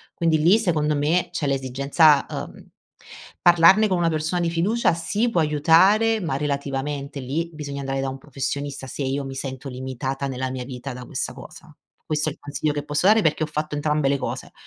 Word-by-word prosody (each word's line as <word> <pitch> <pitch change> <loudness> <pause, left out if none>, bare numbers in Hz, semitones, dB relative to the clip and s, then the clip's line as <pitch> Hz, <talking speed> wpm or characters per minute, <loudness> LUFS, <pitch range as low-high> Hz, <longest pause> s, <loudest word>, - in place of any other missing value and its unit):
quindi 165 -2 +2
lì, 175 +7 +5
secondo 155 -8 +1
me, 155 +5 +1
c'è 150 - -3
l'esigenza, 140 +3 +3
uhm - - -7 0.7
parlarne 175 +5 +6
con 190 - +1
una 170 -1 +2
persona 160 +3 -1
di 170 - +1
fiducia 180 +7 +1
sì, 200 +8 -1
può 205 - 0
aiutare, 180 +9 +4
ma 165 -8 -2
relativamente, 140 0 -3
lì 155 +7 -3
bisogna 145 -2 -6
andare 135 0 -2
da 135 - -2
un 135 - -6
professionista 140 0 -5
se 140 - -5
io 135 +1 -1
mi 135 0 -7
sento 135 0 -6
limitata 130 +1 -4
nella 130 -1 -3
mia 130 -1 -5
vita 130 +1 -7
da 125 0 -9
questa - - -4
cosa. - - -13 0.3
Questo 155 0 -1
è - - -6
il - - -21
consiglio 145 +1 -2
che 145 0 -3
posso 150 +4 0
dare 215 +2 +6
perché 155 -3 +1
ho - - -1
fatto 150 0 -3
entrambe 150 -1 +1
le 140 - +2
cose 130 - -5
150 Hz, 195 wpm, -23 LUFS, 135-165 Hz, 0.7 s, parlarne